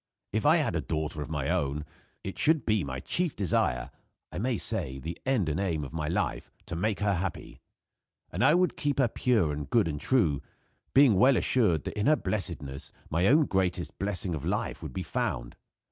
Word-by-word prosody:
If 110 Hz, +6 st, +1 dB
I 160 Hz, +3 st, +6 dB
had 145 Hz, -, 0 dB
a 80 Hz, -, 0 dB
daughter 75 Hz, -1 st, -3 dB
of 75 Hz, -, -5 dB
my 75 Hz, -3 st, -2 dB
own, 75 Hz, -4 st, -1 dB, 0.4 s
it 95 Hz, -, -6 dB
should 155 Hz, -5 st, +3 dB
be 110 Hz, -4 st, +2 dB
my 65 Hz, -2 st, -4 dB
chief 175 Hz, -4 st, 0 dB
desire 80 Hz, -10 st, 0 dB, 0.4 s
I -, -, -5 dB
may 120 Hz, +2 st, 0 dB
say, 85 Hz, -, -3 dB
the 80 Hz, +6 st, -5 dB
end 125 Hz, -10 st, +2 dB
and 75 Hz, +3 st, -1 dB
aim 85 Hz, -6 st, -1 dB
of 70 Hz, -, -8 dB
my 75 Hz, -2 st, -2 dB
life, -, -, -2 dB, 0.2 s
to 85 Hz, -, -5 dB
make 105 Hz, +5 st, -1 dB
her 105 Hz, -1 st, +2 dB
happy. 90 Hz, -1 st, -4 dB, 0.7 s
I 155 Hz, -, +4 dB
would 180 Hz, 0 st, +2 dB
keep 145 Hz, -2 st, -1 dB
her 135 Hz, -3 st, +4 dB
pure, 110 Hz, -9 st, +1 dB
and 75 Hz, -1 st, -5 dB
good 115 Hz, -7 st, +3 dB
and 75 Hz, -2 st, -4 dB
true; 80 Hz, -, +2 dB, 0.5 s
being 135 Hz, -4 st, +7 dB
well 130 Hz, +3 st, +6 dB
assured 95 Hz, -, +2 dB
that -, -, -5 dB
in 105 Hz, -, +1 dB
her 155 Hz, -, +6 dB
blessedness 85 Hz, -, -4 dB, 0.2 s
my 85 Hz, +4 st, +2 dB
own 150 Hz, +5 st, +5 dB
greatest 95 Hz, -5 st, -1 dB
blessing 95 Hz, -2 st, -2 dB
of 75 Hz, -, -4 dB
life -, -, -2 dB
would -, -, -6 dB
be -, -, -3 dB
found. -, -, -3 dB
95 Hz, 200 wpm, -29 LUFS, 75-120 Hz, 0.7 s, being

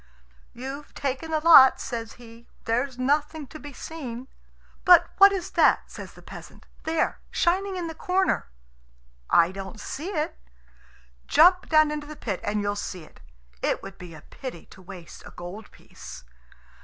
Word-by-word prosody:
"You've 270 Hz, +4 st, -8 dB
taken 275 Hz, +3 st, -3 dB
the 315 Hz, -1 st, +1 dB
lot," 305 Hz, -5 st, +8 dB
says 230 Hz, -2 st, -5 dB
he; 235 Hz, -1 st, -15 dB, 0.2 s
"there's 245 Hz, +3 st, -1 dB
nothing 295 Hz, +3 st, 0 dB
to 310 Hz, +4 st, -12 dB
be 290 Hz, -, -9 dB
seen." 260 Hz, -3 st, -8 dB, 0.5 s
"But 350 Hz, -2 st, +6 dB
what 395 Hz, 0 st, +9 dB
is 385 Hz, -1 st, -4 dB
that," -, -, +3 dB
says -, -, -9 dB
the -, -, -16 dB
peasant -, -, -12 dB, 0.2 s
"there, 320 Hz, 0 st, 0 dB
shining 380 Hz, +3 st, 0 dB
in 355 Hz, -, -3 dB
the 325 Hz, -, -5 dB
corner?" 370 Hz, -, 0 dB, 0.8 s
"I 170 Hz, +1 st, +4 dB
don't 195 Hz, +2 st, -8 dB
see 300 Hz, -, -6 dB
it." 305 Hz, -6 st, -3 dB, 0.9 s
"Jump 360 Hz, +3 st, +5 dB
down 310 Hz, -1 st, +5 dB
into 295 Hz, -1 st, -5 dB
the 305 Hz, -, -8 dB
pit 205 Hz, -9 st, -4 dB
and 210 Hz, 0 st, -1 dB
you'll 205 Hz, 0 st, -1 dB
see 185 Hz, -4 st, -6 dB
it. 155 Hz, -, -18 dB, 0.4 s
It -, -, -1 dB
would 195 Hz, 0 st, -10 dB
be 175 Hz, -3 st, -10 dB
a 155 Hz, -, -12 dB
pity 255 Hz, -11 st, -9 dB
to 190 Hz, -, -14 dB
waste 180 Hz, -3 st, -11 dB
a -, -, -11 dB
gold 185 Hz, +5 st, -9 dB
piece." -, -, -12 dB
275 Hz, 165 wpm, -25 LUFS, 210-320 Hz, 0.9 s, what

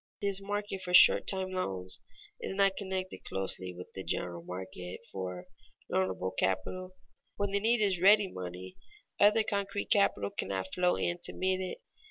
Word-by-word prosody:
This 200 Hz, -1 st, 0 dB
market 205 Hz, -1 st, -3 dB
for 180 Hz, -1 st, +1 dB
short -, -, +8 dB
time 190 Hz, -1 st, +1 dB
loans 95 Hz, -, -3 dB, 0.4 s
is -, -, -4 dB
not 195 Hz, -1 st, +3 dB
connected 190 Hz, -2 st, -4 dB
closely 95 Hz, -1 st, -3 dB
with 90 Hz, 0 st, -11 dB
the 95 Hz, -, -6 dB
general 85 Hz, -2 st, -3 dB
market 90 Hz, +1 st, -7 dB
for 90 Hz, -2 st, -5 dB, 0.5 s
loanable 95 Hz, 0 st, 0 dB
capital. 185 Hz, -, -1 dB, 0.4 s
When 200 Hz, -1 st, -1 dB
the 200 Hz, -, +2 dB
need 225 Hz, +2 st, +2 dB
is 195 Hz, -3 st, +3 dB
for 175 Hz, -, -1 dB
ready 205 Hz, +1 st, +7 dB
money, 90 Hz, -, -7 dB, 0.4 s
other 210 Hz, +2 st, +5 dB
concrete 200 Hz, -1 st, -2 dB
capital 100 Hz, -, +3 dB
cannot 95 Hz, -1 st, -3 dB
flow 180 Hz, 0 st, +2 dB
in 175 Hz, 0 st, -1 dB
to -, -, 0 dB
meet 185 Hz, 0 st, 0 dB
it. 185 Hz, -, -5 dB
185 Hz, 165 wpm, -31 LUFS, -, 0.5 s, short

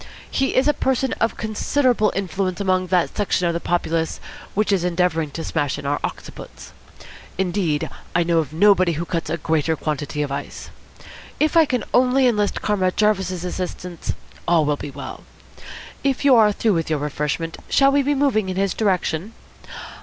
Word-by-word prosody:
He 270 Hz, -, 0 dB
is 260 Hz, -, +3 dB
a 295 Hz, -, +4 dB
person 265 Hz, -1 st, 0 dB
of 230 Hz, -, 0 dB
considerable 225 Hz, +1 st, +1 dB
influence 190 Hz, 0 st, -2 dB
among 185 Hz, -2 st, +1 dB
that 180 Hz, -1 st, +1 dB
section 185 Hz, -3 st, +1 dB
of 170 Hz, -, 0 dB
the 170 Hz, -, -1 dB
populace 165 Hz, -2 st, -1 dB, 0.4 s
which 210 Hz, 0 st, +1 dB
is 190 Hz, -3 st, +2 dB
endeavouring 175 Hz, -3 st, 0 dB
to 165 Hz, +3 st, -6 dB
smash 145 Hz, -4 st, -1 dB
in -, -, -8 dB
our 145 Hz, +1 st, 0 dB
occiputs. -, -, -8 dB, 0.7 s
Indeed, 175 Hz, -5 st, 0 dB, 0.3 s
I 175 Hz, -, +4 dB
know 170 Hz, -1 st, +2 dB
of 150 Hz, -3 st, -2 dB
nobody 185 Hz, 0 st, +4 dB
who 165 Hz, +2 st, -3 dB
cuts 165 Hz, -1 st, -3 dB
a 170 Hz, -, -1 dB
greater 160 Hz, 0 st, 0 dB
quantity 150 Hz, -1 st, -3 dB
of 140 Hz, -, -4 dB
ice. 140 Hz, -, -6 dB, 0.7 s
If 305 Hz, +1 st, +2 dB
I 325 Hz, -1 st, +7 dB
can 250 Hz, -5 st, -1 dB
only 255 Hz, +1 st, +4 dB
enlist 210 Hz, -4 st, +1 dB
Comrade 190 Hz, -3 st, 0 dB
Jarvis's 190 Hz, -4 st, +1 dB
assistance, 180 Hz, -1 st, -4 dB, 0.3 s
all 165 Hz, -3 st, +4 dB
will 145 Hz, 0 st, +1 dB
be 145 Hz, -, -7 dB
well. 140 Hz, +1 st, -8 dB, 0.8 s
If 275 Hz, 0 st, 0 dB
you 275 Hz, -, +7 dB
are 215 Hz, -2 st, +6 dB
through 215 Hz, +1 st, +1 dB
with 165 Hz, -2 st, -1 dB
your 155 Hz, -, +1 dB
refreshment, 150 Hz, +3 st, -3 dB
shall 275 Hz, 0 st, +4 dB
we 285 Hz, +1 st, +3 dB
be 290 Hz, +1 st, +1 dB
moving 245 Hz, -8 st, +1 dB
in 185 Hz, -, -3 dB
his 195 Hz, -1 st, +1 dB
direction? 190 Hz, -1 st, -1 dB
185 Hz, 175 wpm, -21 LUFS, 165-215 Hz, 0.8 s, I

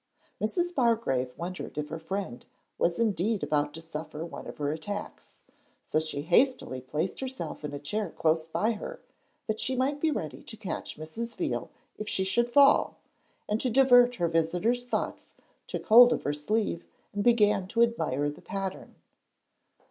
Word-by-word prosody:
Mrs. 350 Hz, -, 0 dB
Bargrave 225 Hz, -, +1 dB
wondered 180 Hz, -1 st, -6 dB
if 150 Hz, 0 st, -3 dB
her 160 Hz, +1 st, -5 dB
friend 165 Hz, -6 st, -4 dB, 0.4 s
was 170 Hz, -, +2 dB
indeed 215 Hz, -2 st, +1 dB
about 150 Hz, -1 st, +1 dB
to 165 Hz, -, -7 dB
suffer 160 Hz, -1 st, -7 dB
from 170 Hz, -, -6 dB
one -, -, -8 dB
of -, -, -8 dB
her 145 Hz, -1 st, -1 dB
attacks. 205 Hz, +7 st, -6 dB, 0.4 s
So 155 Hz, -, +1 dB
she 155 Hz, -2 st, -3 dB
hastily 180 Hz, -, +2 dB
placed 150 Hz, +8 st, -3 dB
herself 260 Hz, -10 st, -5 dB
in 150 Hz, -, -4 dB
a 145 Hz, -, -4 dB
chair 205 Hz, +9 st, -2 dB
close 160 Hz, 0 st, +1 dB
by 170 Hz, +8 st, +1 dB
her, 365 Hz, -, -6 dB, 0.5 s
that 220 Hz, 0 st, -2 dB
she 255 Hz, +4 st, -1 dB
might 275 Hz, +3 st, 0 dB
be 320 Hz, -, +3 dB
ready 160 Hz, -, -4 dB
to 220 Hz, -, -10 dB
catch 185 Hz, -6 st, -5 dB
Mrs. 225 Hz, +10 st, -5 dB
Veal -, -, -2 dB, 0.3 s
if 215 Hz, -, -4 dB
she 190 Hz, -, 0 dB
should 235 Hz, +5 st, +1 dB
fall, 280 Hz, +2 st, +5 dB, 0.5 s
and, 210 Hz, +1 st, 0 dB
to 255 Hz, -, +1 dB
divert 245 Hz, -1 st, +6 dB
her 175 Hz, -5 st, +1 dB
visitor's 175 Hz, +9 st, +1 dB
thoughts, 245 Hz, -, -3 dB, 0.3 s
took -, -, -5 dB
hold 240 Hz, +2 st, +9 dB
of -, -, 0 dB
her 145 Hz, -, 0 dB
sleeve, 170 Hz, +4 st, -1 dB, 0.3 s
and 205 Hz, 0 st, -1 dB
began 210 Hz, -5 st, +4 dB
to 230 Hz, +4 st, +3 dB
admire 160 Hz, -, 0 dB
the 150 Hz, -, -13 dB
pattern. 195 Hz, -1 st, -5 dB
200 Hz, 170 wpm, -28 LUFS, 160-235 Hz, 0.5 s, hold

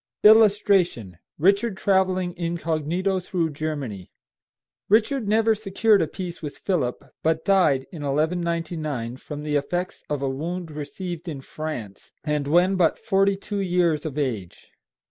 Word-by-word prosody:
[Illustration: 200 Hz, -, +4 dB, 0.2 s
RICHARD 200 Hz, +5 st, +2 dB
TRAVELLING 185 Hz, -2 st, +1 dB
INCOG. 165 Hz, -3 st, -2 dB, 0.3 s
THROUGH 175 Hz, -2 st, -1 dB
GERMANY.] 140 Hz, -11 st, -4 dB, 0.8 s
Richard 220 Hz, +3 st, +2 dB
never 220 Hz, +2 st, +3 dB
secured 210 Hz, 0 st, +2 dB
a 160 Hz, -, +1 dB
peace 175 Hz, +1 st, -7 dB
with 150 Hz, -3 st, -6 dB
Philip, 155 Hz, -11 st, -2 dB
but 160 Hz, 0 st, 0 dB
died, 165 Hz, -9 st, +3 dB
in 165 Hz, -, -8 dB
1199, 155 Hz, -4 st, -2 dB
from 150 Hz, +2 st, -7 dB
the 150 Hz, -1 st, -1 dB
effects 175 Hz, +6 st, -3 dB
of 145 Hz, -2 st, -2 dB
a -, -, +1 dB
wound 165 Hz, +5 st, -4 dB
received 170 Hz, +4 st, -6 dB
in 150 Hz, -5 st, -4 dB
France, 130 Hz, -10 st, -7 dB
and 150 Hz, -1 st, -1 dB
when 180 Hz, +5 st, +3 dB
but 170 Hz, -3 st, +3 dB
forty 195 Hz, -1 st, +2 dB
two 205 Hz, +1 st, -4 dB
years 175 Hz, -5 st, +1 dB
of 150 Hz, -3 st, -5 dB
age. 115 Hz, -, -4 dB
170 Hz, 135 wpm, -24 LUFS, 150-190 Hz, 0.8 s, Illustration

